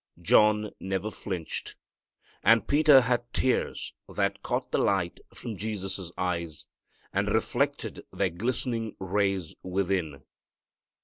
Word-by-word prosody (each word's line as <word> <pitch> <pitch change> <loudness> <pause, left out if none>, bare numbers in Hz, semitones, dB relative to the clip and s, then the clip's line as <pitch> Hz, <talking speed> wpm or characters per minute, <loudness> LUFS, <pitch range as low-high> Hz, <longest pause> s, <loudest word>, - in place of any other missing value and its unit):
John 105 +4 +4
never 95 +3 -2
flinched. 90 -7 -5 0.7
And 115 0 +5
Peter 145 -2 +7
had 120 -1 0
tears 130 - 0 0.2
that - - -1
caught - - -2
the - - +2
light 95 -4 +1
from 115 -3 -6
Jesus' 95 -4 -4
eyes, 85 -4 -2 0.5
and - - +1
reflected - - 0
their 95 -3 0
glistening 115 +3 -2
rays 95 -2 0
within. 90 -6 -1
100 Hz, 110 wpm, -28 LUFS, 90-115 Hz, 0.7 s, Peter